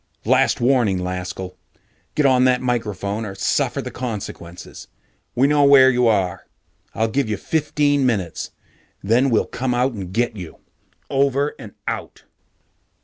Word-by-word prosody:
"Last 130 Hz, +4 st, +3 dB
warning, 120 Hz, -6 st, +2 dB
Laskell! 90 Hz, 0 st, -5 dB, 0.6 s
Get 150 Hz, -, +2 dB
on 130 Hz, -1 st, +4 dB
that 125 Hz, -1 st, +3 dB
microphone 110 Hz, -4 st, -2 dB
or 100 Hz, -3 st, -6 dB
suffer 95 Hz, -, 0 dB
the -, -, -6 dB
consequences! 95 Hz, -7 st, -7 dB, 0.5 s
We 130 Hz, -, +3 dB
know 145 Hz, 0 st, +3 dB
where 135 Hz, -2 st, +7 dB
you 125 Hz, -1 st, +2 dB
are. 95 Hz, -5 st, 0 dB, 0.5 s
I'll 110 Hz, +1 st, +1 dB
give 130 Hz, +1 st, -1 dB
you 105 Hz, -, -1 dB
fifteen 145 Hz, +1 st, 0 dB
minutes, 100 Hz, -10 st, -1 dB, 0.5 s
then 120 Hz, +7 st, +3 dB
we'll 115 Hz, -, +2 dB
come 130 Hz, -1 st, -3 dB, 0.4 s
get 120 Hz, +2 st, 0 dB
you. 90 Hz, -5 st, -9 dB, 0.5 s
Over 140 Hz, +1 st, +1 dB
and -, -, -10 dB
out." -, -, -5 dB
120 Hz, 135 wpm, -21 LUFS, 100-135 Hz, 0.6 s, where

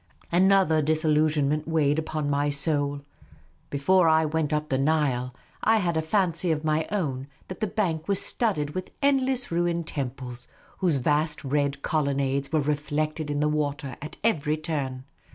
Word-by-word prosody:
Another 185 Hz, -3 st, +4 dB
disillusion 155 Hz, -1 st, +2 dB
weighed 155 Hz, -2 st, +2 dB
upon 155 Hz, -1 st, -3 dB
my 145 Hz, 0 st, +1 dB
soul. 145 Hz, -1 st, +1 dB, 0.7 s
Before 165 Hz, +5 st, +3 dB
I 160 Hz, 0 st, +4 dB
went 155 Hz, -1 st, -1 dB
up 150 Hz, 0 st, -1 dB
the 130 Hz, -, +1 dB
Nile, 135 Hz, -4 st, +1 dB, 0.3 s
I 225 Hz, 0 st, +4 dB
had 175 Hz, -5 st, 0 dB
a 160 Hz, -, +2 dB
fancy 175 Hz, +1 st, 0 dB
of 155 Hz, -1 st, -1 dB
my 155 Hz, 0 st, 0 dB
own 140 Hz, -10 st, -2 dB, 0.2 s
that 185 Hz, -, -7 dB
the 215 Hz, -, 0 dB
bank 175 Hz, -6 st, -1 dB
was 200 Hz, -2 st, +2 dB
studded 155 Hz, -11 st, 0 dB
with 185 Hz, +3 st, -5 dB
endle.ss 265 Hz, -4 st, +1 dB
ruined 170 Hz, 0 st, 0 dB
temples, 125 Hz, -4 st, -5 dB, 0.3 s
whose 180 Hz, -5 st, +2 dB
vast 150 Hz, +4 st, 0 dB
red 140 Hz, 0 st, -1 dB
colon 140 Hz, -3 st, 0 dB
nades 140 Hz, 0 st, -1 dB
were 155 Hz, -1 st, +2 dB
reflected 150 Hz, +1 st, -2 dB
in 145 Hz, 0 st, -1 dB
the 150 Hz, -, +2 dB
water 145 Hz, -3 st, -2 dB
at 150 Hz, +2 st, -8 dB
every 155 Hz, -9 st, +1 dB
turn. 140 Hz, -5 st, -3 dB
155 Hz, 160 wpm, -26 LUFS, 145-165 Hz, 0.7 s, Another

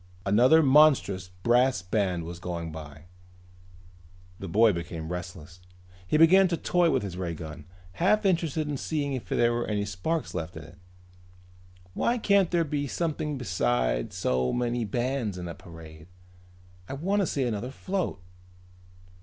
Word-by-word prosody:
Another 125 Hz, +11 st, +5 dB
monstrous 135 Hz, -10 st, +4 dB, 0.2 s
brass 120 Hz, -4 st, +3 dB
band 90 Hz, -3 st, -1 dB
was 85 Hz, +1 st, -8 dB
going 85 Hz, -2 st, -5 dB
by. 75 Hz, -1 st, -10 dB, 1.4 s
The 95 Hz, -, -6 dB
boy 110 Hz, +4 st, +4 dB
became 85 Hz, -1 st, -6 dB
restless. 90 Hz, -1 st, -7 dB, 0.5 s
He 155 Hz, -, +2 dB
began 185 Hz, +4 st, +6 dB
to 170 Hz, -2 st, -1 dB
toy 175 Hz, 0 st, +2 dB
with -, -, +1 dB
his 95 Hz, -3 st, -6 dB
ray 85 Hz, -3 st, -3 dB
gun, 80 Hz, -1 st, -9 dB, 0.3 s
half 205 Hz, -, +1 dB
interested 165 Hz, -5 st, +1 dB
in 145 Hz, -1 st, -2 dB
seeing 145 Hz, -1 st, -2 dB
if 130 Hz, -, -5 dB
there 120 Hz, 0 st, +2 dB
were 120 Hz, 0 st, -2 dB
any 105 Hz, -1 st, -1 dB
sparks 105 Hz, -, -3 dB
left 85 Hz, -1 st, -5 dB
in 80 Hz, -, -8 dB
it. 75 Hz, -, -15 dB, 1.1 s
"Why 240 Hz, -, +1 dB
can't 200 Hz, -5 st, +3 dB
there 170 Hz, -1 st, +2 dB
be 145 Hz, -1 st, -2 dB
something 150 Hz, -1 st, -2 dB
besides -, -, -1 dB
so 65 Hz, 0 st, 0 dB
many 120 Hz, -1 st, -1 dB
bands 120 Hz, -2 st, -2 dB
in 90 Hz, -1 st, -6 dB
a 85 Hz, -, -5 dB
parade? 80 Hz, -2 st, -13 dB, 0.8 s
I -, -, -4 dB
wanna 190 Hz, +7 st, 0 dB
see 140 Hz, -, -1 dB
another 120 Hz, 0 st, -2 dB
float." 185 Hz, -, -3 dB
110 Hz, 150 wpm, -27 LUFS, -, 1.4 s, began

